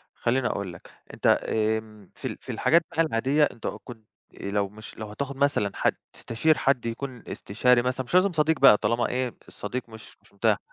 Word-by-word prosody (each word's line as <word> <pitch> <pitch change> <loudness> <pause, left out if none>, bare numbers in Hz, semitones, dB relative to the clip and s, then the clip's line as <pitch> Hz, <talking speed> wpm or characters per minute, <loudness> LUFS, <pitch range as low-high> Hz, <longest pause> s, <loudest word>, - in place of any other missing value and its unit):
خلّيني 125 +2 0
أقول 100 -5 -2
لك، 90 - -14 0.2
أنت - - -3
آمم، 110 -2 0
في - - -4
ال - - -6
في - - -7
الحاجات 170 +1 +3
بقى 165 - +3
العادية 145 +1 +2
أنت 115 - -4
أ - - -3
كنت 115 -4 -11 0.4
آآ 100 - -4
لو 100 -1 0
مش 105 +2 -12
لو 110 - -5
هتاخد 140 +5 -5
مثلًا 140 -7 +1
حد، - - +1 0.2
تستشير 155 +7 +1
حد 130 -3 +1
يكون 125 +1 -5
استشاري 120 +4 +2
مثلًا، 130 +1 -1
مش 125 - -8
لازم 185 +1 +5
صديق 160 -1 +2
بقى 135 -6 +8
طالما 115 +3 0
إيه 125 -1 -2
الصديق 120 +4 -5
مش 110 -1 -13
مش - - -25
متاح، - - +2
120 Hz, 200 wpm, -26 LUFS, 110-140 Hz, 0.4 s, بقى